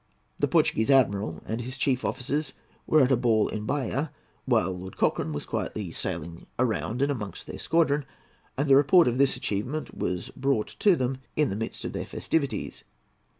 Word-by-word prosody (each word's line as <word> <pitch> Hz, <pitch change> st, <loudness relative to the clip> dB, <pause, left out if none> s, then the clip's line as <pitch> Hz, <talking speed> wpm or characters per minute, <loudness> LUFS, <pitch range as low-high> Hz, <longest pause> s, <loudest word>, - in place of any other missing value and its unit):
The -, -, +2 dB
Portuguese 110 Hz, +4 st, +2 dB
Admiral 100 Hz, -, +2 dB
and 115 Hz, +2 st, -3 dB
his 125 Hz, +3 st, -6 dB
chief 130 Hz, -2 st, +1 dB
officers 140 Hz, +2 st, -2 dB, 0.3 s
were 155 Hz, -, +5 dB
at 130 Hz, -, +2 dB
a -, -, +6 dB
ball 115 Hz, -3 st, +2 dB
in 105 Hz, 0 st, -4 dB
Bahia 145 Hz, +1 st, -1 dB, 0.3 s
while 95 Hz, -, +2 dB
Lord 95 Hz, 0 st, -8 dB
Cochrane 80 Hz, -, +1 dB
was 75 Hz, -, -4 dB
quietly 100 Hz, -6 st, -3 dB
sailing 85 Hz, -1 st, -5 dB
round 120 Hz, +1 st, 0 dB
and 145 Hz, -, +2 dB
amongst 105 Hz, -9 st, -5 dB
their -, -, -8 dB
squadron, 150 Hz, -4 st, +2 dB, 0.5 s
and 145 Hz, +2 st, 0 dB
the 135 Hz, -, +7 dB
report 145 Hz, +4 st, +6 dB
of 125 Hz, +1 st, 0 dB
this 140 Hz, -1 st, +3 dB
achievement 125 Hz, +10 st, -3 dB
was 90 Hz, 0 st, -3 dB
brought 135 Hz, -5 st, 0 dB
to 200 Hz, -4 st, +5 dB
them 130 Hz, -2 st, -1 dB, 0.2 s
in 150 Hz, -6 st, +2 dB
the -, -, -2 dB
midst 110 Hz, +2 st, -4 dB
of -, -, -4 dB
their -, -, -4 dB
festivities. 140 Hz, -5 st, -2 dB
125 Hz, 180 wpm, -27 LUFS, 105-140 Hz, 0.5 s, the